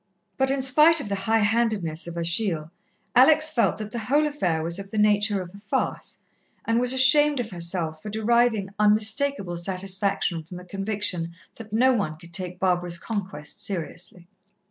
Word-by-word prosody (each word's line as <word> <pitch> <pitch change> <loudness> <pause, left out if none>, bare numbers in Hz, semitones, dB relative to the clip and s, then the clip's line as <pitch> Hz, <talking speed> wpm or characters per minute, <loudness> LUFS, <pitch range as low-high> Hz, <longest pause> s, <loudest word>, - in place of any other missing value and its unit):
But 265 -1 +2
in 270 -1 0
spite 305 +5 +5
of 230 - -5
the - - -2 0.2
high 225 -1 +3
handedness 210 -8 -1
of 170 0 -7
Achille, 170 -2 0 0.4
Alex 310 +5 +5
felt 240 -6 +1
that 215 -1 -7
the 235 - -4
whole 280 +8 +1
affair 180 - -1
was 170 +3 -3
of 195 0 -8
the 215 - -6
nature 205 -1 +2
of 175 0 -13
a 200 - -12
farce, 205 0 -3 0.5
and 230 +1 +1
was 250 0 0
ashamed 280 +2 +5
of 230 -2 -4
herself 170 -3 -2
for 210 - -7
deriving 220 -2 +1
unmistakable 210 -1 +1
satisfaction 190 -1 -2
from 175 +3 -10
the 180 - -11
conviction 195 -3 -3 0.2
that 220 -2 -11
no 255 +4 +3
one 175 -10 -2
could 170 +1 -16
take 180 0 -2
Barbara's 180 -2 0
conquest 190 -3 -5
seriously. 180 -2 -3
205 Hz, 170 wpm, -24 LUFS, 175-235 Hz, 0.5 s, spite